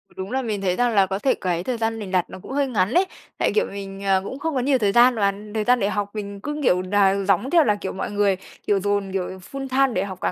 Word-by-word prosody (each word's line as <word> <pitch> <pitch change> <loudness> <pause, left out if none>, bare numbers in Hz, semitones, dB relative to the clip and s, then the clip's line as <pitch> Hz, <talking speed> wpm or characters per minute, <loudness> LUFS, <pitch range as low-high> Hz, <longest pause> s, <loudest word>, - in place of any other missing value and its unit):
Đúng 190 +3 -6
là 265 +1 0
mình 215 -5 -3
thấy 180 -2 +1
rằng 245 0 +1
là 195 -2 +5
có 190 +1 -3
thể 265 - +2
cái 175 -2 -2
thời 250 +1 -2
gian 225 0 -1
mình 195 -3 -6
đặt 180 -2 +1
nó - - -9
cũng - - -10
hơi 280 0 +1
ngắn 210 -2 0
ấy, 365 +2 +4 0.3
tại, - - +1
kiểu, 440 - +3
mình, 195 0 -7
ờ, 190 -1 +2
cũng 265 +7 -6
không 325 0 -2
có - - +2
nhiều 265 +1 +2
thời 205 -4 +1
gian 240 +2 +5
và 200 -2 +2 0.2
thời 215 -1 0
gian 245 +2 +3
để 200 - +1
học 205 0 -2
mình 200 -1 -5
cứ, 295 +4 -4
kiểu, 180 -5 +3
nà 195 +1 +3
giống 195 +7 +2
theo 330 -1 +5
là, 210 -5 +2
kiểu, 200 -2 -5
mọi 190 - -4
người, 205 -2 +2 0.3
kiểu 200 -1 +3
dồn, 205 -1 -1
kiểu, 185 -2 -1 0.2
full-time 270 -2 0
để 185 - 0
học 190 -2 -7
cả - - 0
205 Hz, 290 wpm, -23 LUFS, 195-250 Hz, 0.3 s, là